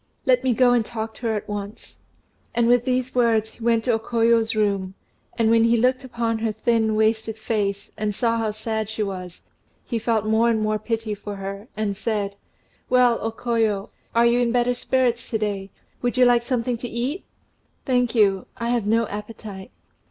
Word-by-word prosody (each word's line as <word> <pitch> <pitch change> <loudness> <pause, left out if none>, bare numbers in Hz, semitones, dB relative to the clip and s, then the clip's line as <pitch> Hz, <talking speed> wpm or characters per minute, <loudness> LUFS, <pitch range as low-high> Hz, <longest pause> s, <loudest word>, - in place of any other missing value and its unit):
Let 255 -1 +3
me 255 -3 +2
go 245 +1 +5
and 240 -2 +3
talk 220 0 -5
to 240 - -5
her 220 - 0
at 210 - -4
once." 205 0 -7 0.6
And 235 -1 +3
with 240 0 +4
these 255 0 0
words, 225 -3 +2
he 230 - -12
went 230 -1 +2
to 245 - +1
O 225 - +1
Koyo's 230 0 +2
room; 200 -3 0 0.4
and 225 -1 +3
when 230 0 +5
he 230 0 +4
looked 255 +3 +2
upon 235 -3 -2
her 225 0 0
thin 220 0 +1
wasted 220 0 +1
face, 205 -3 -2
and 210 -1 -2
saw 230 +1 +1
how 225 -1 0
sad 220 0 -3
she 220 0 -2
was, 185 -3 -6 0.4
he 235 - -2
felt 225 -1 0
more 220 +2 +3
and 225 -1 +2
more 215 0 0
pity 225 0 -2
for 205 0 -7
her, 195 +2 -6
and 210 -2 -1
said, 205 -1 -2 0.5
"Well, 250 -2 +4
O 225 - -1
Koyo, 225 -4 -1 0.2
are 235 0 +5
you 235 +1 +4
in 240 -1 +2
better 245 0 +2
spirits 245 -1 0
to 225 - 0
day? 200 -2 -3 0.3
Would 245 0 -1
you 250 - +6
like 245 -1 +5
something 240 -1 -1
to 245 - -5
eat?" 255 +10 -2 0.6
"Thank 250 -2 +1
you, 195 -4 +3
I 235 0 -2
have 240 -4 0
no 230 +2 +3
appetite." 210 -2 -8
225 Hz, 195 wpm, -23 LUFS, 215-240 Hz, 0.6 s, you